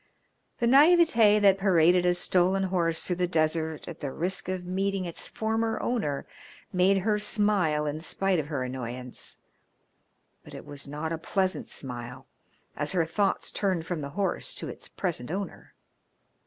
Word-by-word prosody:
The 240 - 0
naivete 270 -6 +6
that 195 -2 +4
paraded 180 -2 +4
a 175 - +3
stolen 185 +2 +2
horse 170 -3 +1
through 180 - -1
the 180 0 +1
desert 160 -1 -1
at 170 -1 -8
the 140 -3 -4
risk 180 +5 -2
of 185 -1 -3
meeting 195 +1 -1
its 170 - -6
former 225 +1 -1
owner 150 - -2 0.5
made 185 +2 +4
her 210 +2 +1
smile 205 -8 +1
in 150 +1 -3
spite 190 +2 0
of 150 - -3
her 140 -4 -2
annoyance, 125 -1 -6 1.1
but - - -12
it - - -9
was 145 -1 -7
not 150 +3 -4
a 165 - -4
pleasant 185 -1 -1
smile, 125 0 -6 0.5
as 150 +5 -1
her 170 -3 +2
thoughts 195 +4 0
turned 185 -5 -1
from 165 -2 -3
the 140 - -5
horse 200 -1 -1
to - - -5
its - - -8
present 165 - -3
owner. 195 +4 -6
180 Hz, 160 wpm, -27 LUFS, 155-195 Hz, 1.1 s, naivete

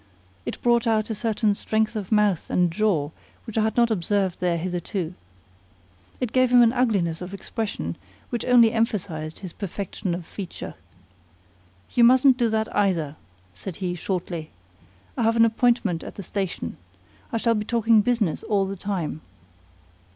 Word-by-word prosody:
It - - -4
brought 235 0 +3
out 220 0 +1
a - - 0
certain 215 -1 +1
strength 220 +2 0
of 205 -2 -4
mouth 210 -5 +2
and 175 -2 +2
jaw 170 -6 +1 0.3
which 225 - -8
I 220 - +3
had 220 +2 0
not 235 -1 +4
observed 195 -1 0
there 175 -2 +1
hitherto. 175 0 -3 1.1
It 250 -3 -2
gave 255 -1 +3
him 245 -1 +7
an 230 0 +4
ugliness 200 -10 +1
of 185 +2 -6
expression 220 +2 -4 0.3
which 240 - -2
only 240 -3 +6
emphasized 180 -9 -2
his 185 -4 -7
perfection 195 -2 -4
of 175 -1 -7
feature. 190 +1 -7 1.2
"You 240 - +4
mustn't 255 +2 +6
do 240 -3 +2
that 220 0 -1
either," 170 -8 +1 0.4
said 170 - -7
he, 180 -1 -3
shortly. 175 -3 -3 0.7
"I - - -2
have 225 0 +3
an 230 0 +6
appointment 225 -6 +1
at - - -8
the 200 - -7
station. 190 - -4 0.5
I 230 - 0
shall 230 +1 +2
be 210 -2 -1
talking 225 -1 +3
business 215 -7 0
all 200 -2 +1
the 195 +1 -4
time." 180 -6 -3
210 Hz, 160 wpm, -24 LUFS, 180-230 Hz, 1.2 s, him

